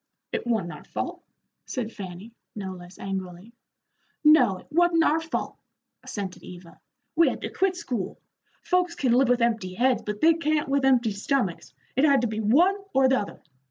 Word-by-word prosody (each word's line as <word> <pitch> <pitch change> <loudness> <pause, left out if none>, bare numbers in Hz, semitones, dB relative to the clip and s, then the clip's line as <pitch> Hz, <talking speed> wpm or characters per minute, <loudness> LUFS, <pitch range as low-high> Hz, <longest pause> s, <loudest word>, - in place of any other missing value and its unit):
"It - - -3
wa'n't 215 -8 0
our - - -10
fault," - - -5 0.4
said 240 -5 -3
Fanny, 195 +2 -8 0.2
no 195 -3 -5
less 180 0 -12
angrily. 190 +2 -6 0.7
"No, 270 -11 +6
it - - -15
wa'n't 335 0 +4
our 320 0 +3
fault," 325 0 -4 0.5
assented 195 -3 -6
Eva. 175 -1 -12 0.4
"We 335 - +5
had - - -5
to - - -4
quit 380 -1 +1
school. 250 - -4 0.5
Folks 360 -2 +1
can 260 -6 +1
live 255 +1 +4
with 245 -1 +3
empty 220 -6 -1
heads, 250 +3 +2
but 210 0 -5
they 330 +1 +6
can't 310 -2 0
with 275 0 +1
empty 245 -4 +3
stomachs. 200 -2 -2 0.2
It 265 - +2
had 280 -3 +5
to 240 - +1
be 215 0 -4
one 315 - +4 0.2
or 265 0 +5
the 265 - +3
other. 205 - -7
245 Hz, 180 wpm, -26 LUFS, 195-300 Hz, 0.7 s, No